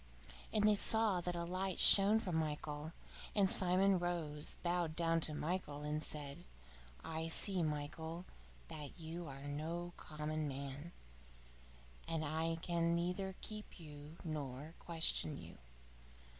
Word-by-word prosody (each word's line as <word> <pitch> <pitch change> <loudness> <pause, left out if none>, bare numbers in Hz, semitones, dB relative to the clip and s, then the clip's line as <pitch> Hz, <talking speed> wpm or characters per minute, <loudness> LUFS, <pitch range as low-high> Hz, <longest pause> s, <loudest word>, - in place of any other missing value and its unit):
And 215 -1 +4
they 215 - +7
saw 215 -3 +2
that 175 0 -2
a 170 - -2
light 185 +1 -2
shone 200 +2 +9
from 190 -7 -1
Michael. 150 -1 -2 0.4
And 200 -2 +5
Simon 185 +1 +3
rose, 165 -4 0
bowed 175 -2 0
down 165 -1 +2
to 155 -1 +1
Michael, 150 -3 -2
and 150 +1 -1
said: 145 -2 -4 0.6
"I 160 0 -2
see, 185 +3 +4
Michael, 160 +3 -3 0.4
that 150 +2 -7
you 165 +1 -5
are 135 0 -8
no 165 +5 -3
common 155 0 -3
man, 140 +3 -5 1.2
and 160 -1 -1
I 160 +2 0
can 170 -1 +2
neither 180 +2 -1
keep 215 -2 -6
you 150 0 -10
nor 150 -2 -4
question 160 -3 0
you. 85 -5 -10
165 Hz, 130 wpm, -38 LUFS, 150-175 Hz, 1.2 s, shone